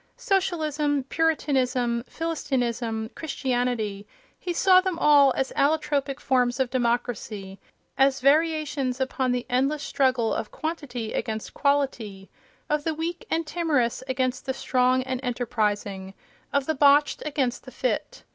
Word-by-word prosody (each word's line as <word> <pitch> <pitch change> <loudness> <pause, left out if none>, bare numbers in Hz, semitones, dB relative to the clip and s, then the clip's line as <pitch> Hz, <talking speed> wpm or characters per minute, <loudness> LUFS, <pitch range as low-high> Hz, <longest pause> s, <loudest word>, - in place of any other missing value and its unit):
Socialism, 310 - 0
Puritanism, 260 -7 +1
Philistinism, 240 -8 -2
Christianity—he 245 - -3
saw 370 +1 +5
them 370 -2 -2
all 290 -4 +6
as 265 - -1
allotropic 285 -2 +1
forms 250 -1 +1
of 260 -2 0
democracy, 235 -5 -2 0.4
as 270 0 +4
variations 295 -2 +1
upon 260 -1 0
the 245 -1 -1
endless 275 +4 0
struggle 255 -5 +1
of 215 - -3
quantity 290 -8 -5
against 220 -1 -3
quality, 245 -9 -1 0.4
of 300 0 0
the 320 0 -1
weak 335 +2 -4
and 330 0 0
timorous 300 -8 0
against 255 0 -1
the 265 - -1
strong 255 0 +2
and 260 -1 -3
enterprising, 210 -6 -2 0.4
of 280 -1 +1
the 315 - 0
botched 290 +1 +4
against 275 -5 -2
the - - -10
fit. - - -3
265 Hz, 125 wpm, -25 LUFS, 245-300 Hz, 0.4 s, all